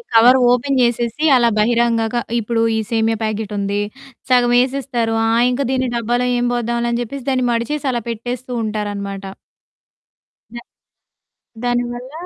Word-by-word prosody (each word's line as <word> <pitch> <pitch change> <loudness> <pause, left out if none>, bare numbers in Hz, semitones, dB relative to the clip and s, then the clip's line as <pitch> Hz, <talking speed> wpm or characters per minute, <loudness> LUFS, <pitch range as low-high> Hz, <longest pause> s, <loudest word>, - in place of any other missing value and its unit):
Cover 245 +3 +7
open 255 +3 +1
చేసేసి 240 +4 0
అలా 240 -2 +4
బహిరంగాగ 230 +1 +1 0.2
ఇప్పుడు 230 +1 -1
ఈ - - 0
సేమియా 225 0 +1
ప్యాకెటుంది. 205 -2 -2 0.5
సగం 245 -1 +4
యేసేస్తారు. 250 -3 -1
ఆ! - - +2 0.2
ఇంక 250 - -1
దీన్ని 260 -1 0
డబ్బాలో 240 +2 0
ఏం 245 - 0
పోద్దాంలే 235 0 -1
అని 235 - -1
జెప్పేసి 255 +2 -6
దాన్ని 255 -1 +1
మడిచేసి 270 +5 -2
అలా 240 -2 -2
పెట్టేస్తూ 245 +3 -5
ఉంటారనమాట. 205 -2 -4 1.3
దా 235 - -6 1.0
దానివల్ల 245 +1 -2
235 Hz, 125 wpm, -18 LUFS, 225-250 Hz, 1.3 s, Cover